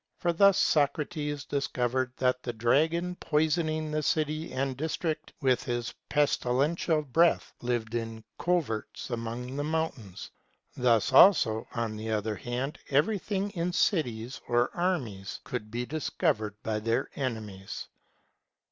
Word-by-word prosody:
For 170 -1 0
thus 200 +2 +6
Socrates 145 0 +1
discovered 130 -2 -1
that 125 0 +1
the 120 - -4
dragon, 160 +10 +2
poison 160 +1 +1
ing 155 0 -2
the 155 0 0
city 155 +1 0
and 135 0 -1
district 155 +2 -2
with 130 -3 +2
his 120 -1 -2 0.2
pestilential 150 +3 +1
breath, 165 +5 +2
lived 120 -2 -2
in 115 -1 -3 0.2
coverts 155 -10 -1
among 120 +2 -4
the 145 - -1
mountains; 150 - -3 0.4
thus 125 0 +2
also, 120 - +6
on 115 -2 -2
the 110 +1 -5
other 110 0 -1
hand, 125 - -4
everything 195 +6 +1
in 175 -2 -2
cities 125 - 0
or 120 0 +1
armies 125 - -2
could 115 -4 -5
be 120 +2 -3
discovered 140 - -1
by 110 -1 -1
their 115 +4 -1
enemies. 110 -7 -4
135 Hz, 130 wpm, -29 LUFS, 115-155 Hz, 0.4 s, thus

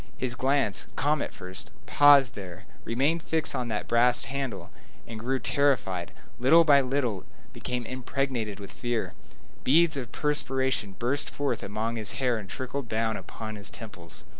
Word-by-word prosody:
His 130 -2 -2
glance, 130 -4 +1
calm 145 +1 +1
at - - -3
first, 95 0 -6 0.2
paused 140 -4 +6
there, 95 -1 -8 0.2
remained 140 +8 +1
fixed 160 -1 0
on 125 - -2
that 105 -2 -3
brass 120 +1 +3
handle, 130 -5 -4 0.4
then 115 - -6
grew 130 +4 0
terrified, 125 -12 +1
and - - -19
little 165 +6 +7
by 145 -3 +6
little 125 -7 -1 0.3
became 125 -1 -4
impregnated 125 -4 -2
with 100 - -9
fear. 120 -2 -2 0.5
Beads 155 +2 +5
of 125 -3 -5
perspiration 130 -7 0
burst 130 +6 -1
forth 145 -1 -2
among 110 +3 -3
his 110 -2 -3
hair 125 -4 0
and 95 -3 -9
trickled 130 -1 -5
down 110 0 0
upon 110 +3 -7
his 100 0 -7
temples. 90 -7 -9
125 Hz, 160 wpm, -28 LUFS, 110-140 Hz, 0.5 s, little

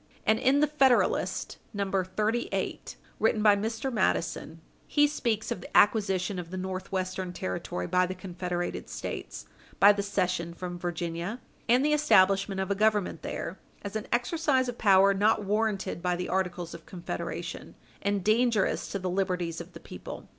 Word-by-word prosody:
And 220 0 +3
in 270 +3 +3
the - - +6
Federalist 270 -4 +2 0.2
No. 200 -1 -2
38, 215 +6 -2 0.2
written 220 -1 +2
by 210 -2 +7
Mr. 225 +6 -2
Madison, 165 -5 -1 0.3
he 295 -1 +4
speaks 235 -7 -1
of 180 - -3
the - - -1
acquisition 195 -3 +3
of 170 -2 -7
the 185 - -5
Northwestern 185 0 -3
Territory 90 - -4
by 180 - +2
the 185 - -5
confederated 180 -1 -4
States, - - -6 0.3
by 200 - +9
the 205 -1 -1
cession 180 -4 -1
from 175 0 -6
Virginia, 175 +5 -3 0.3
and 250 +4 +5
the 300 - +3
establishment 195 -8 +4
of 190 +1 -1
a - - +5
Government 210 -1 +1
there, - - -5 0.2
as 200 +1 -6
an 215 - -3
exercise 260 +1 +1
of 245 -1 -5
power 195 -1 +6
not 210 +2 +2
warranted 205 -3 -1
by 180 0 +1
the 180 +1 -4
Articles 180 -2 -2
of 170 - -11
Confederation, 175 -2 -6 0.3
and 200 -1 0
dangerous 220 0 +2
to - - -1
the 185 -1 -4
liberties 180 -3 -1
of - - -12
the - - -9
people. - - -9
195 Hz, 160 wpm, -28 LUFS, 180-220 Hz, 0.3 s, by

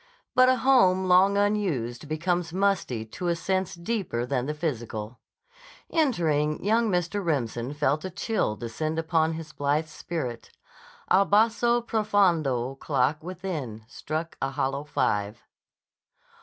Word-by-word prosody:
But 255 0 +6
a 255 - +5
home 230 -8 +4
long 185 +2 +5
unused 170 - 0
becomes 170 +2 -1
musty 185 - 0
to 175 +11 -5
a 170 - +2
sense 190 +1 -1
deeper 170 - -2
than 130 0 -1
the 150 - -2
physical. 120 -7 -4 0.7
Entering, 160 - +1
young 225 +2 +3
Mr. 180 +2 -1
Remsen 130 -4 -2
felt 145 +1 +1
a 185 - -3
chill 200 - -1
descend 155 +8 -4
upon 160 0 +1
his 160 -1 -8
blithe 145 +3 0
spirit. 150 -7 -5 0.6
A 195 - +5
basso 230 +4 +3
profondo 180 - +1
clock 135 +2 0
within 165 - -5
struck 155 +6 -5
a 135 - 0
hollow 135 0 -2
five. 105 -5 -1
165 Hz, 130 wpm, -26 LUFS, 135-195 Hz, 0.7 s, But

